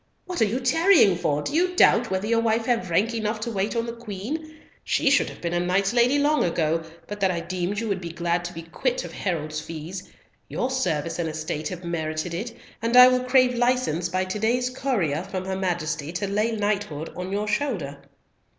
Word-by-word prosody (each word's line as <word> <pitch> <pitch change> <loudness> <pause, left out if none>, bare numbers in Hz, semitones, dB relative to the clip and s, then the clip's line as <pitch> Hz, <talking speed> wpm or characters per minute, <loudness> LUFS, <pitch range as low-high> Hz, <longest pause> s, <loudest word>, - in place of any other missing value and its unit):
What 360 -6 -4
are - - +6
you 225 +5 -1
tarrying 270 - +5
for? 150 -3 -1
Do - - -4
you 360 +3 +1
doubt 235 -8 +5
whether 190 +1 -1
your 230 +1 +2
wife 225 0 +1
have 230 -7 0
rank 210 +7 +2
enough 215 -1 -2
to 235 - -3
wait 205 +2 -1
on 230 0 0
the 235 - -5
Queen? 240 +8 -6 0.3
She 280 - +2
should 285 - +3
have - - -12
been 170 0 -2
a 175 - +1
knight's 195 +4 +1
lady 245 +3 +4
long 295 +1 +3
ago, 165 -1 +1 0.2
but 205 +3 -7
that 195 -1 +3
I 175 -2 -1
deemed 185 +3 -3
you 230 - -3
would 195 -2 -1
be 170 - -5
glad 170 +1 -1
to 175 - -5
be 165 -1 -7
quit - - -2
of - - -9
herald's 155 -5 -3
fees; 165 +4 -7 0.4
your 255 - -2
service 165 - -1
and 165 -2 -1
estate 155 0 -4
have 180 -1 -6
merited 160 0 -3
it, 215 +8 -4 0.3
and 230 +2 +2
I 250 0 +11
will 255 0 +1
crave 255 -1 +4
license 240 -9 +1
by 185 +2 0
to 185 +3 -4
day's 250 +3 +1
courier 210 - -1
from 185 0 -5
her 190 0 -2
Majesty 170 -5 -2
to 190 +3 -2
lay 210 +3 0
knighthood 205 -8 -2
on 180 +1 -5
your 205 +1 -1
shoulder." 205 - -2
200 Hz, 215 wpm, -25 LUFS, 170-240 Hz, 0.4 s, I